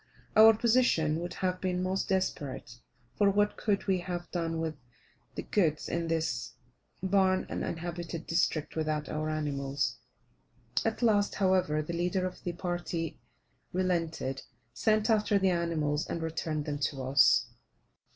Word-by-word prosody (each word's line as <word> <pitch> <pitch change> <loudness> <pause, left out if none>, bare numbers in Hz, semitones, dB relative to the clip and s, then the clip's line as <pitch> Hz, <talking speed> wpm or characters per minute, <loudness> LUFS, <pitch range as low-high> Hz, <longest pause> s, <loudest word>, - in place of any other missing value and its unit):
Our 220 +1 +9
position 220 -11 +3
would 175 +1 -5
have 185 -1 -1
been 180 -1 -1
most 190 +1 -1
desperate; 140 -10 -2 0.4
for, 205 -1 +4
what 205 +1 +2
could 205 -2 0
we 190 -2 +2
have 175 -1 -5
done 165 -2 -2
with 160 -1 -2 0.6
the - - -4
goods 160 -7 +1
in 170 -1 -2
this 160 -7 -1 0.5
barren 190 -1 +3
uninhabited 170 0 -4
district 165 -2 0
without 155 -1 -1
our 155 0 -2
animals. 140 -4 -1 0.9
At 225 +2 -1
last, 205 -3 +3
however, 185 -6 +2
the 170 - -5
leader 180 +2 0
of 185 - -6
the 175 - -3
party 175 -2 -3 0.5
relented, 165 -7 -1 0.3
sent 215 -1 +2
after 210 -1 +3
the 190 -1 +3
animals, 160 -4 0
and - - -3
returned 160 -2 -3
them 145 -1 -3
to 140 -1 -2
us. 135 +2 +5
170 Hz, 140 wpm, -30 LUFS, 155-190 Hz, 0.9 s, Our